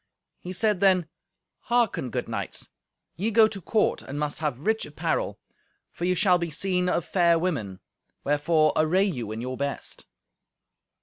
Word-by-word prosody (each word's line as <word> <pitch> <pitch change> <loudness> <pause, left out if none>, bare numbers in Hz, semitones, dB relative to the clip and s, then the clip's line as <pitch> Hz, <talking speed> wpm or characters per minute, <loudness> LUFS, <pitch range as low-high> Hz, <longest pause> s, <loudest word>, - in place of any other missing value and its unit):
He 180 - -7
said 205 +1 +1
then, 185 -4 +4 0.6
"Hearken, 235 - +1
good - - -3
knights; - - -4 0.5
ye 205 +6 0
go 220 0 +6
to 200 -3 -7
court, 215 +5 +1
and 140 +2 -6
must 150 -1 -2
have 145 -5 -2
rich 220 0 +1
apparel, - - -2 0.5
for 175 - -4
ye 180 0 +2
shall 180 0 +4
be 170 -1 -2
seen 180 +3 0
of 175 - 0
fair 170 -3 +3
women. 135 - -2 0.4
Wherefore 155 +2 +2
array 165 +5 +3
you 125 - -3
in 110 +1 -4
your 130 +1 -4
best." 140 0 -4
175 Hz, 160 wpm, -26 LUFS, 145-195 Hz, 0.6 s, go